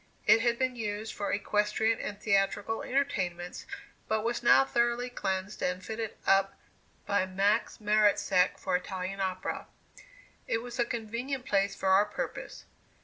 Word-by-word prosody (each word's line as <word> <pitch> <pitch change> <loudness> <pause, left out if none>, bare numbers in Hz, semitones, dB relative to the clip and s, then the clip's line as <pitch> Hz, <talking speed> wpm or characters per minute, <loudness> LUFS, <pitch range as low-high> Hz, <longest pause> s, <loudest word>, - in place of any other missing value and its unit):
It 215 +2 +6
had 235 0 +2
been 255 0 0
used 215 -1 -4
for 205 - -3
equestrian 210 +2 +1
and 205 -1 -5
theatrical 205 +1 +1
entertainments, 185 -11 -2 0.4
but 220 0 0
was 235 +1 -1
now 270 +2 +6
thoroughly 240 0 0
cleansed 190 -3 -3
and 180 +1 -2
fitted 220 -1 -4
up 195 0 +3 0.5
by 200 -2 +1
Max 200 +4 +1
Maretzek 210 -3 +3
for - - -1
Italian 185 +1 -3
opera. 185 -1 -3 0.8
It 225 - -1
was 245 +1 -8
a 240 - +3
convenient 235 +4 -4
place 195 0 +1
for 190 - -1
our 195 +2 +6
purpose. - - -6
210 Hz, 145 wpm, -30 LUFS, 195-235 Hz, 0.8 s, It